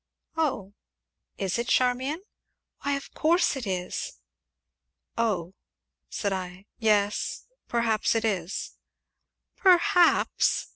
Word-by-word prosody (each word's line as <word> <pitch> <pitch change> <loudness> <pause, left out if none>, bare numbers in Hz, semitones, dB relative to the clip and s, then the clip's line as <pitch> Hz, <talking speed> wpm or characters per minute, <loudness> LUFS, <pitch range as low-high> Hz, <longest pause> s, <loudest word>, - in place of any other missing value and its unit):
"Oh! 255 -12 -1 0.6
is 195 +3 -1
it, 235 - -2
Charmian?" 260 +8 +1 0.6
"Why, 285 - 0
of 280 0 -5
course 335 0 +2
it 255 -5 -5
is." 180 -1 -3 1.0
"Oh!" 190 -6 -1 0.6
said 200 -2 -2
I; 185 0 -6
"yes 210 -2 +1 0.2
perhaps 230 -2 +1
it 225 0 +1
is." 190 -4 -2 0.8
"Perhaps!" 360 -1 +4
225 Hz, 95 wpm, -27 LUFS, 195-280 Hz, 1.0 s, Perhaps